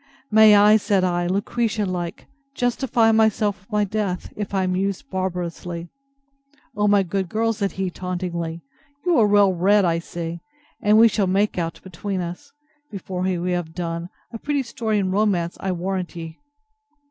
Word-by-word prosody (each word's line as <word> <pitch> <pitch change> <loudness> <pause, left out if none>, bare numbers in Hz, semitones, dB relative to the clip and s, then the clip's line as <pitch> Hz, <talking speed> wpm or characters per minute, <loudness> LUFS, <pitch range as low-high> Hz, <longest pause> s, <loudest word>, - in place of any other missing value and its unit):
May 215 -1 +8
I, 210 +1 +7
said 200 -2 +1
I, 175 -1 0
Lucretia 210 +3 -1
like, 175 -2 -4 0.3
justify 245 -2 +2
myself 220 -2 +2
with 195 +5 -28
my 210 0 +2
death, 200 -3 -3
if 210 -2 -4
I 195 -1 +1
am 185 0 0
used 195 +8 -2
barbarously! 175 -2 -4 0.9
O 210 0 +1
my 205 -1 +4
good 190 0 -2
girl! 225 +3 +1
said 200 -2 -2
he, 190 -1 -2
tauntingly, 175 -2 -4 0.4
you 350 -6 +3
are 215 - +5
well 200 -2 +4
read, 195 +3 +3
I 165 -1 +1
see; 170 0 -6 0.4
and 210 -1 +4
we 230 +1 +8
shall 200 -2 0
make 195 +1 +1
out 165 -1 -3
between 190 +2 -4
us, 175 0 -6 0.4
before 190 -3 -5
we 180 -1 -1
have 175 -3 -3
done, 170 0 -4 0.2
a 230 - -5
pretty 285 +1 -1
story 230 -3 -2
in 190 -2 0
romance, 190 -4 +1
I 190 - -2
warrant 185 0 -3
ye. 165 -1 -8
190 Hz, 170 wpm, -22 LUFS, 175-210 Hz, 0.9 s, May